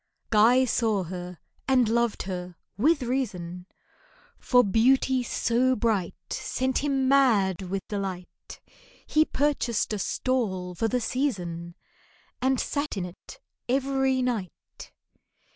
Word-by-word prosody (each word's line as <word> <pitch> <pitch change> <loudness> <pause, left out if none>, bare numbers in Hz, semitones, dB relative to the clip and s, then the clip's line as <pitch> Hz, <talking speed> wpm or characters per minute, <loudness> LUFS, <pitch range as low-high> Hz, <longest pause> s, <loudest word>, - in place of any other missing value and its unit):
GUY 235 +4 +5
saw 220 -5 +1
her, 180 0 -7 0.3
and 255 -3 +4
loved 235 0 0
her, 180 -2 -6 0.2
with 285 - +2
reason, 185 -9 -3 0.7
For 250 -1 +4
beauty 255 +5 +3
so 245 +1 +1
bright 210 -6 0 0.2
Sent 260 0 -1
him 275 -2 0
mad 220 -10 +3
with 190 +1 -4
delight; 190 -3 -6 0.5
He 310 0 +3
purchased 265 -8 0
a 210 - -2
stall 190 -6 -1
for 225 +6 -1
the 250 +2 0
season, 175 -10 -2 0.7
And 260 0 +2
sat 285 -6 -2
in 185 - -2
it 180 0 -12 0.3
every 265 0 +1
night. 225 -8 -5
230 Hz, 115 wpm, -26 LUFS, 185-260 Hz, 0.7 s, GUY